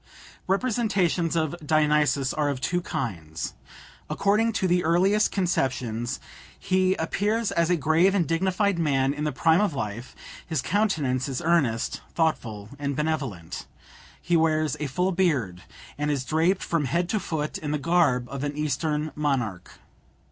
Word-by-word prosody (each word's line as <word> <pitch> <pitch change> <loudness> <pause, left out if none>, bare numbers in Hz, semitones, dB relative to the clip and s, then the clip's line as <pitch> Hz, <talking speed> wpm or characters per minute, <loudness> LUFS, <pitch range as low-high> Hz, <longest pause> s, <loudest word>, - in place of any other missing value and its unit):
Representations 195 - +1
of 160 -2 0
Dionysus 150 -3 +2
are 150 -1 0
of 140 -2 -2
two 175 +6 0
kinds. 85 - -4 0.6
According 215 +3 +2
to 190 -3 0
the 180 0 +2
earliest 190 +6 +3
conceptions, 125 - -1 0.4
he 185 0 +2
appears 205 +7 0
as 170 0 +1
a 180 - +4
grave 165 +6 +3
and 175 -5 +2
dignified 190 +3 +1
man 135 -4 +2
in 150 +1 -3
the 150 - 0
prime 160 +6 +3
of 205 -8 0
life; 115 +1 -5 0.3
his 160 -3 -2
countenance 150 - 0
is 130 - -2
earnest, 145 -9 +1
thoughtful, 110 -11 -1
and 140 -1 -2
benevolent; 135 - -3 0.5
he 175 - 0
wears 155 -3 +2
a 150 - -2
full 180 +8 0
beard, 140 - 0 0.4
and 150 0 0
is 140 -3 -1
draped 165 +6 +1
from 165 -4 0
head 170 +5 0
to 215 - +1
foot 155 -5 -3
in 150 - -4
the 150 - 0
garb 145 -6 +2
of 140 +2 -5
an 145 0 -3
Eastern 150 +1 -1
monarch. 130 -12 -2
155 Hz, 150 wpm, -26 LUFS, 135-180 Hz, 0.6 s, a